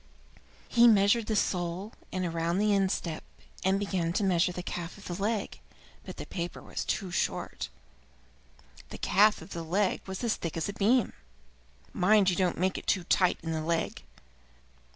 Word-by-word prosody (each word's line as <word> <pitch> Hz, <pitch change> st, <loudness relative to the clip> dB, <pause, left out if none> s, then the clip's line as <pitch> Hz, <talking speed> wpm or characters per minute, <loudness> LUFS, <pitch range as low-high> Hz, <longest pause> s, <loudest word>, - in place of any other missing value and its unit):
He 240 Hz, 0 st, +6 dB
measured 210 Hz, +1 st, +4 dB
the 220 Hz, -, 0 dB
sole, 180 Hz, +2 st, -1 dB, 0.2 s
and 180 Hz, -3 st, -2 dB
round 170 Hz, +2 st, 0 dB
the 210 Hz, 0 st, +3 dB
instep, 190 Hz, -4 st, 0 dB, 0.4 s
and 190 Hz, +1 st, +3 dB
began 185 Hz, -4 st, -1 dB
to 205 Hz, -, 0 dB
measure 180 Hz, -1 st, +3 dB
the 180 Hz, 0 st, -6 dB
calf 175 Hz, 0 st, -5 dB
of 205 Hz, -, -13 dB
the 175 Hz, -, -4 dB
leg, 210 Hz, 0 st, -2 dB, 0.4 s
but -, -, -9 dB
the -, -, -6 dB
paper 175 Hz, -1 st, -5 dB
was -, -, -5 dB
too 190 Hz, -4 st, -2 dB
short. -, -, -2 dB, 1.2 s
The -, -, -7 dB
calf 210 Hz, -3 st, +3 dB
of 180 Hz, -, -14 dB
the 170 Hz, -, -4 dB
leg 185 Hz, +4 st, 0 dB
was 190 Hz, +4 st, -5 dB
as 230 Hz, -2 st, +1 dB
thick 165 Hz, -1 st, -4 dB
as 165 Hz, -, -1 dB
a 200 Hz, -, -4 dB
beam. 230 Hz, +5 st, +2 dB, 0.8 s
"Mind 195 Hz, 0 st, +4 dB
you -, -, -1 dB
don't 180 Hz, -1 st, +1 dB
make 185 Hz, +2 st, 0 dB
it -, -, -16 dB
too 185 Hz, -, +2 dB
tight 180 Hz, +1 st, +3 dB
in 165 Hz, -, -3 dB
the 160 Hz, -1 st, -1 dB
leg." 165 Hz, +1 st, -1 dB
190 Hz, 175 wpm, -29 LUFS, 170-205 Hz, 1.2 s, He